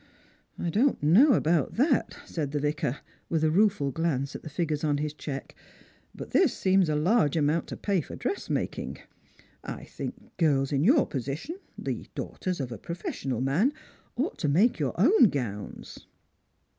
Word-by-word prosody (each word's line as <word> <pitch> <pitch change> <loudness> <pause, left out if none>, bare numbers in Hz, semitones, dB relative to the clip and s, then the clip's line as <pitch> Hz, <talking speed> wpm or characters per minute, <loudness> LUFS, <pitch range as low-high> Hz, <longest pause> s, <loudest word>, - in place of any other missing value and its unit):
" - - -36
I 170 - -2
don't 245 - +2
know 225 - +6
about 160 - +1
that," 265 +1 +2
said 150 -4 -4
the 145 - +1
Vicar, 150 -2 -1 0.3
with 160 -2 0
a 155 - +3
rueful 190 -6 +3
glance 140 -3 -1
at - - -6
the - - -8
figures 150 0 -2
on 145 -2 +2
his 150 0 -2
cheque; 140 -2 -6 0.6
"but - - -8
this 355 -10 +3
seems 190 -3 +3
a 150 - +1
large 165 - +2
amount 155 +2 +1
to - - -6
pay 195 -4 0
for - - -9
dressmaking. 400 - -3 0.7
1 - - -6
think - - -8
girls 140 -5 +2
in 140 0 +1
your 265 - +5
position 145 - -5
— - - -37
the - - -3
daughters 185 -3 -4
of 130 -3 -3
a 115 - -6
professional 135 - -4
man 165 - +2 0.2
— - - -33
ought 270 +8 -2
to 150 - 0
make 185 - +3
your 145 +1 -2
own 315 - +6
gowns." 110 -9 -6
155 Hz, 175 wpm, -28 LUFS, 140-195 Hz, 0.7 s, know